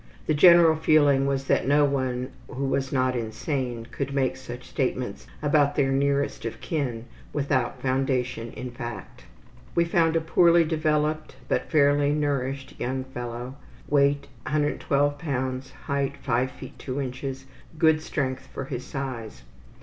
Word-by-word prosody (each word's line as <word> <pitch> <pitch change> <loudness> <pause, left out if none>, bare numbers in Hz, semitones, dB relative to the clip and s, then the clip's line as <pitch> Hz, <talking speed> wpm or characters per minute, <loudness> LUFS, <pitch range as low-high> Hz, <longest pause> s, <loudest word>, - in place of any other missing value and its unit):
The 155 - +2
general 170 +1 +7
feeling 145 -3 +4
was 135 -1 0
that - - +1
no 145 +1 +5
one 130 -2 -1 0.2
who 135 +2 -3
was 135 0 -1
not 130 -1 +1
insane 120 +1 -3
could 140 0 -3
make 135 -2 +1
such 125 -1 -9
statements 125 -5 -2 0.2
about 145 -1 +3
their 135 -1 +2
nearest 140 +1 +1
of 115 - -5
kin 125 -8 -3 0.3
without 135 -4 -1
foundation 130 -3 0
in 125 -1 -6
fact. 120 - -8 0.5
We 170 - +4
found 165 -1 +2
a - - +4
poorly 170 +1 +5
developed, 155 -2 0
but - - -1
fairly 145 -1 +4
nourished 140 -2 -1
young 130 +1 -2
fellow; 125 0 -6 0.3
weight 140 0 +3 0.2
112 145 -1 +1
lbs., 130 -3 -3
height 140 0 -1
5 130 0 +1
ft. - - -10
2 130 +1 -4
in.; 135 0 -3 0.4
good 160 -1 +4
strength 130 -4 -3
for 135 - -6
his 125 -2 -5
size. 125 - -6
135 Hz, 140 wpm, -26 LUFS, 130-145 Hz, 0.5 s, general